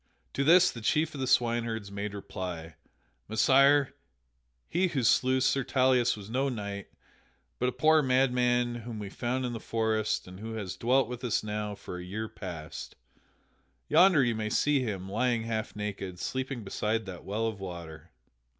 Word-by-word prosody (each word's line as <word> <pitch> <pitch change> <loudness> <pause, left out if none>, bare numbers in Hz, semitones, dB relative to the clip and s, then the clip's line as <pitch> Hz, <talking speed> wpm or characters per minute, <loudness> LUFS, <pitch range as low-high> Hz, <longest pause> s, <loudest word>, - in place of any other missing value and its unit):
To 140 - 0
this 175 +5 +6
the 115 - -9
chief 155 +8 +1
of 140 - -7
the 130 - -1
swineherds 115 -4 +1
made 100 +1 -4
reply: 90 -4 -6 0.6
"Messire, 135 +4 +4 0.7
he 185 +2 +1
who 140 -7 -1
slew 130 +3 +3
Sir 135 +1 +2
Tauleas 130 -3 +2
was 100 -1 -9
no 130 +5 0
knight, 100 -5 -5 0.7
but 125 - +2
a - - -3
poor 155 +3 +4
madman 125 -2 +2
whom 115 -1 -7
we 100 -2 -6
found 125 +4 -2
in 120 - -3
the 115 - -4
forest 110 -2 -1
and 90 +1 -10
who 110 +1 -6
has 100 -5 -4
dwelt 130 +1 +2
with 125 +1 -7
us 120 -3 0
now 105 -1 -3
for 95 -3 -8
a - - -7
year 105 +5 -4
past. 85 -7 -8 0.9
Yonder 170 -2 +6
you 120 -2 +1
may 110 -1 -2
see 145 +5 +2
him, 100 -7 -3
lying 115 +3 0
half 110 -1 -3
naked, 100 -3 -5
sleeping 130 +4 -3
beside 105 +2 -1
that 95 -3 -8
well 105 +3 -2
of 110 -3 -3
water." 85 -4 -8
115 Hz, 170 wpm, -29 LUFS, 100-130 Hz, 0.9 s, this